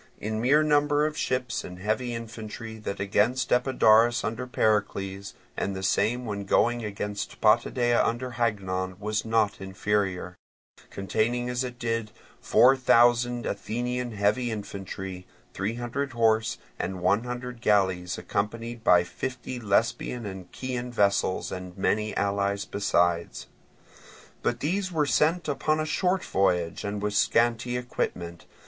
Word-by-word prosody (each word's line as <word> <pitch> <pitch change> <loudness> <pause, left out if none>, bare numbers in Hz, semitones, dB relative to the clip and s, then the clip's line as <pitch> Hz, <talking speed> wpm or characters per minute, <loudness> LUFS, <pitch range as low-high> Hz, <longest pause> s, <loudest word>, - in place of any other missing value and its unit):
In 110 +1 -3
mere 145 +6 +4
number 145 0 +3
of 155 0 -2
ships 125 -3 -1
and 90 - -8
heavy 110 +5 -1
infantry 115 -1 -7
that 100 -2 -5
against 105 +6 +1
Epidaurus 120 -2 +4
under 115 +4 -3
Pericles, 100 -4 -1 0.2
and 100 - -2
the 95 - -5
same 120 +6 +1
when 100 -2 -3
going 120 +4 +2
against 105 0 -4
Potidæa 120 +2 +3
under 120 +2 -2
Hagnon, 95 -6 -2
was 105 +2 -2
not 110 -3 +1
inferior; 95 -2 -1 0.5
containing 120 +5 -1
as 125 +1 -1
it 125 -1 -6
did 115 -2 -2 0.3
four 130 +2 +5
thousand 120 -1 +3
Athenian 120 +3 -3
heavy 105 +4 +1
infantry, 95 -3 -6 0.3
three 105 +4 -2
hundred 130 +3 -3
horse, 110 -1 +2 0.2
and 95 -1 -3
one 105 +6 +2
hundred 125 -1 -6
galleys 95 -5 +2
accompanied 115 +3 -3
by 90 -5 +6
fifty 130 +6 -5
Lesbian 115 +2 0
and 95 -3 -8
Chian 125 -1 -4
vessels 100 -4 +1
and 90 0 -7
many 105 +2 0
allies 100 0 0
besides. 85 -4 0 1.0
But 120 0 -1
these 185 +5 -1
were 155 -3 +1
sent 160 +4 +2
upon 155 +2 0
a 155 - 0
short 185 +4 0
voyage 90 -4 0
and 100 0 -3
with 105 0 -1
a - - +1
scanty 120 +1 +2
equipment. 85 -8 -4
110 Hz, 135 wpm, -27 LUFS, 100-125 Hz, 1.0 s, by